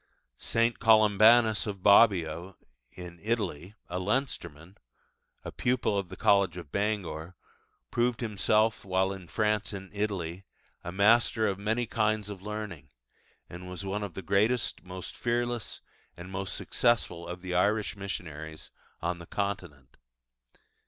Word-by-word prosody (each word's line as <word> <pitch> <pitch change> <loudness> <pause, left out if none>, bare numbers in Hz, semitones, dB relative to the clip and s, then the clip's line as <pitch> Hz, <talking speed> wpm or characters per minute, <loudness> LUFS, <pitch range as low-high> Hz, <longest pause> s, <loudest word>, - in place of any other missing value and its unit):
St. 115 +1 +1
Columbanus 110 0 +5
of 100 -3 -5
Bobbio 95 -4 +4 0.4
(in 90 -1 -10
Italy), 100 -5 -2
a 90 +1 -3
Leinsterman, 95 - -3 0.7
a - - -5
pupil 125 -4 0
of 100 -3 -2
the 95 - -9
college 100 -4 +3
of 85 -5 -9
Bangor, 95 -5 -2 0.6
proved 120 0 +1
himself, 110 0 +1
while 95 0 +1
in 95 -2 -10
France 105 0 0
and 95 0 -8
Italy, 95 -4 -3 0.4
a 85 - -5
master 110 +3 +4
of 100 -2 -1
many 110 +4 0
kinds 110 -2 0
of 95 -2 -8
learning, 105 -9 -6 0.6
and 90 +1 -9
was 90 +2 -6
one 100 +2 -2
of 100 -5 -5
the 95 - -6
greatest, 105 +6 +1
most 90 0 -8
fearless, 120 -1 -2 0.4
and 90 +2 -9
most 95 0 -4
successful 100 -8 0
of 90 +1 -7
the 90 -1 -4
Irish 105 +4 +1
missionaries 80 -6 -6 0.3
on 85 +1 -1
the 85 - -11
Continent. 90 -10 -4
100 Hz, 135 wpm, -29 LUFS, 90-110 Hz, 0.7 s, Columbanus